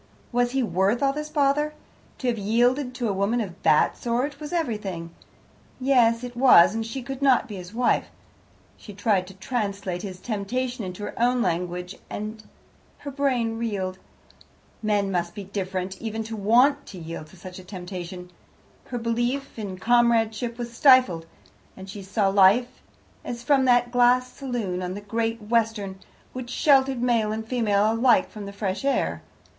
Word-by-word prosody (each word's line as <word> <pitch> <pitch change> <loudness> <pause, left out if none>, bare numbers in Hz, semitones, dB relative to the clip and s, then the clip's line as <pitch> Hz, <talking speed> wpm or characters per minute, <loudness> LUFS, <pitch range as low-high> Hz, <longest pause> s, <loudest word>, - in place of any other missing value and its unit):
Was 245 0 +1
he 270 -1 +1
worth 205 +4 +1
all 275 0 +3
this 300 +1 -5
bother? 295 +1 +1 0.4
To 255 - -4
have 240 -2 +1
yielded 245 +5 +1
to 245 -2 -2
a 205 - 0
woman 200 +5 0
of 200 -6 -3
that 150 - +4
sort 255 +5 -2
was 300 +1 -7
everything, 210 - -3 0.7
yes, 245 -3 +3
it 245 -1 -7
was, 240 -8 +7
and 225 0 -2
she 230 +4 -6
could 270 +2 -6
not 260 -2 +4
be 210 -4 -7
his 180 0 -9
wife. 240 +2 +1 0.7
She 205 - -12
tried 200 -3 +1
to 190 - -12
translate 200 -4 -3
his 190 -3 -7
temptation 245 +4 -3
into 185 +2 -6
her - - -5
own 245 0 +3
language, 180 -1 -2
and 215 +1 -6 0.5
her 285 - -7
brain 250 -5 0
reeled. 190 -5 -3 0.8
Men 205 -2 +1
must 175 -1 -2
be 205 - -6
different, 190 -1 -4
even 225 0 -3
to 220 +1 -6
want 250 +8 +3
to 190 - -9
yield 165 -2 -7
to 190 - -17
such 185 +1 -10
a - - -11
temptation. 180 -1 -8 0.5
Her 245 - -5
belief 240 +3 -2
in 195 -3 -5
comradeship 230 +1 +2
was 240 -1 -6
stifled, 245 - +5 0.5
and 190 0 -9
she 200 +1 -8
saw 195 +1 0
life 200 +6 +4 0.4
as 240 -1 -6
from 275 -1 +3
that 245 -1 +3
glass 250 +1 +3
saloon 235 -9 -3
on 180 0 -4
the 205 - -6
Great 225 +2 -2
Western, 215 -3 0 0.3
which 255 -1 -6
sheltered 265 -2 +3
male 230 -4 +2
and 220 +1 -4
female 215 -3 +2
alike 235 +1 +3
from 210 -2 -8
the - - -6
fresh 200 0 -3
air. 275 0 0
225 Hz, 170 wpm, -25 LUFS, 195-250 Hz, 0.8 s, was